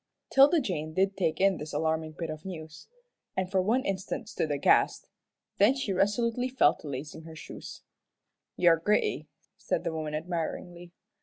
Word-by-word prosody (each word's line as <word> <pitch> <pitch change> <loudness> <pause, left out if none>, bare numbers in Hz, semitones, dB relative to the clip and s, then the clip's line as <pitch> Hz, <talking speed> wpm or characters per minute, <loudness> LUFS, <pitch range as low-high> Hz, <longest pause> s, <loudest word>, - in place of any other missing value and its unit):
'Tilda 280 +5 +6
Jane 155 - -3
did 195 +1 +2
take 170 -5 0
in 195 -1 +4
this 150 0 -7
alarming 160 0 -1
bit 165 -2 -3
of 155 0 -8
news, 160 -4 -8 0.5
and 190 0 -1
for 190 -2 +3
one 230 +7 +1
instant 195 +2 -3
stood 160 -8 -2
aghast. 145 -1 +3 0.5
Then 210 +7 +5
she 265 -8 -2
resolutely 230 +6 +1
fell 260 - +4
to - - -11
lacing 145 +3 -6
on 160 - -13
her 160 - -10
shoes. 155 - -9 0.7
"You're 170 -2 +5
gritty," 205 +6 +1 0.3
said - - -2
the 165 - -2
woman, 155 -1 -3
admiringly. 175 +1 -4
175 Hz, 165 wpm, -29 LUFS, 160-200 Hz, 0.7 s, Tilda